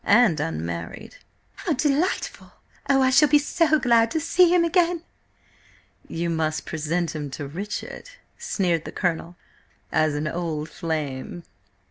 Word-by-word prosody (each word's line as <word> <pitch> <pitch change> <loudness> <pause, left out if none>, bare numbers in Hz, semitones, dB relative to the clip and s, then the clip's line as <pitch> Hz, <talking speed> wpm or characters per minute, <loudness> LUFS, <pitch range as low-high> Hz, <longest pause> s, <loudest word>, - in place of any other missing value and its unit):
And 210 -6 +4
unmarried." 85 - -5 0.4
"How 340 - -1
delightful! 295 +5 -1 0.4
Oh, 270 -1 +4
I 260 - +3
shall 295 +3 +6
be 295 - +6
so 310 +2 +2
glad 235 -4 +3
to 320 - -1
see 350 +3 +4
him 355 -1 +4
again!" 345 -1 +2 1.0
"You 170 +1 -3
must 160 -2 -1
present 165 +2 -2
him 150 -2 -4
to 140 +2 -6
Richard," 200 - -6 0.3
sneered 175 -5 -1
the - - -6
Colonel, 175 -1 -2 0.6
"as 155 -1 +2
an 150 +1 -2
old 160 -2 -3
flame." 160 -2 -4
175 Hz, 135 wpm, -24 LUFS, -, 1.0 s, shall